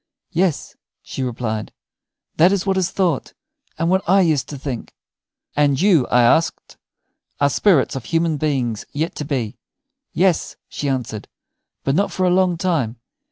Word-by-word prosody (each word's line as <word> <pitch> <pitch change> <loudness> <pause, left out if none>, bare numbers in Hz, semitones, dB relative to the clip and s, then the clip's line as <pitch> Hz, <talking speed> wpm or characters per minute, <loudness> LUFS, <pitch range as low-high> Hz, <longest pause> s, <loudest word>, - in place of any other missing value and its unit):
"Yes," 180 -2 0 0.3
she - - -6
replied; 115 -4 -3 0.7
"that 175 +4 +6
is 200 -1 0
what 195 -1 +1
is 190 -1 +1
thought, 180 -8 -1 0.4
and 165 - 0
what 190 +2 +3
I 195 +1 +6
used 155 -7 +1
to 145 - -6
think." 130 -4 -6 0.6
"And 145 -2 +2
you," 175 -8 +4
I 125 0 +4
asked, 160 +7 +1 0.6
"are 145 0 +3
spirits 175 -12 +3
of 130 -4 -5
human 165 +2 +1
beings 130 -7 -1
yet 155 +4 -2
to 150 - -4
be?" 125 -7 -3 0.5
"Yes," 180 -2 +1
she 145 - -3
answered; 120 -5 -3 0.6
"but 135 - +1
not 200 +7 +1
for 185 - 0
a 180 - +3
long 180 -1 +2
time. 160 -11 0
150 Hz, 160 wpm, -20 LUFS, 130-180 Hz, 0.7 s, that